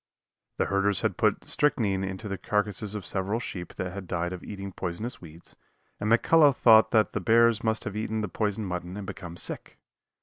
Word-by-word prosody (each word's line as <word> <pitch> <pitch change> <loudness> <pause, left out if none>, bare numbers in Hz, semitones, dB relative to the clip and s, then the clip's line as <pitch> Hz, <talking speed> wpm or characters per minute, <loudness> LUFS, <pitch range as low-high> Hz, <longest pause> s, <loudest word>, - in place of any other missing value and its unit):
The - - +1
herders 100 0 +1
had - - 0
put - - +1
strychnine 105 -10 +1
into 95 +3 -5
the 100 -2 -4
carcasses 105 0 -1
of 100 -4 -5
several 100 +5 -2
sheep 90 -6 -7
that 90 -1 -4
had 100 -2 -7
died 85 +1 -2
of 90 - -8
eating 100 -1 -7
poisonous 95 +7 -5
weeds, 85 0 -14 0.4
and 105 +1 -1
McCullough 145 +4 +5
thought 110 -2 +6
the 110 -2 +2
bears 115 -1 +4
must 110 0 0
have 100 - -5
eaten 110 0 -2
the 105 - -2
poisoned 105 +1 -2
mutton 90 +1 -5
and 105 - -6
become 90 -3 -8
sick. - - -1
100 Hz, 190 wpm, -27 LUFS, 95-110 Hz, 0.4 s, thought